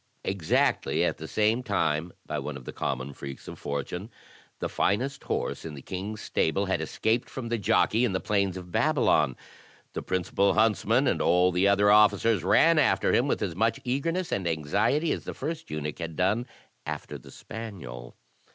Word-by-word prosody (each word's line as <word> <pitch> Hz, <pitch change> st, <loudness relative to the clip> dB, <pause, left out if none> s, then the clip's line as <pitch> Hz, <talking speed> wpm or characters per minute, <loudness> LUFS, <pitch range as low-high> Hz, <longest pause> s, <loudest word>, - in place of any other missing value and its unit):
Exactly 95 Hz, -5 st, +1 dB
at -, -, -1 dB
the 80 Hz, -, -6 dB
same 110 Hz, +6 st, +2 dB
time, 85 Hz, -8 st, 0 dB
by -, -, -3 dB
one 75 Hz, -2 st, -5 dB
of 65 Hz, -, -12 dB
the -, -, -7 dB
common 65 Hz, +3 st, -3 dB
freaks 70 Hz, 0 st, -9 dB
of -, -, -8 dB
fortime, 75 Hz, -, -4 dB, 0.5 s
the -, -, -2 dB
finest 130 Hz, +8 st, -1 dB
horse -, -, -2 dB
in 80 Hz, -2 st, -7 dB
the 70 Hz, -, -9 dB
king's 100 Hz, +3 st, -5 dB
stable 95 Hz, +5 st, 0 dB
had 95 Hz, -, 0 dB
escaped 115 Hz, +2 st, -1 dB
from 120 Hz, -3 st, -6 dB
the 120 Hz, -1 st, -1 dB
jockey 110 Hz, +3 st, +2 dB
in 120 Hz, -, +2 dB
the 95 Hz, -, 0 dB
plains 100 Hz, -3 st, 0 dB
of 90 Hz, -1 st, -9 dB
Babylon. -, -, +2 dB, 0.6 s
The -, -, -3 dB
principal 95 Hz, +2 st, +1 dB
huntsman 110 Hz, +4 st, +3 dB
and -, -, +1 dB
all 90 Hz, +2 st, +4 dB
the 90 Hz, +3 st, +2 dB
other 100 Hz, 0 st, +4 dB
officers 105 Hz, -1 st, +4 dB
ran 165 Hz, -, +5 dB
after 145 Hz, -, +3 dB
him 125 Hz, -, +3 dB
with 135 Hz, -, 0 dB
as 90 Hz, -5 st, -3 dB
much 115 Hz, +7 st, +1 dB
eagerness 165 Hz, +8 st, -1 dB
and 95 Hz, -3 st, -1 dB
anxiety 100 Hz, -, +1 dB
as -, -, -3 dB
the -, -, -5 dB
first 160 Hz, +3 st, -5 dB
eunuch 75 Hz, +1 st, -4 dB
had 85 Hz, -2 st, -5 dB
done 105 Hz, +8 st, +1 dB, 0.4 s
after -, -, -6 dB
the -, -, -15 dB
spaniel. 85 Hz, -, -8 dB
100 Hz, 180 wpm, -27 LUFS, 85-115 Hz, 0.6 s, ran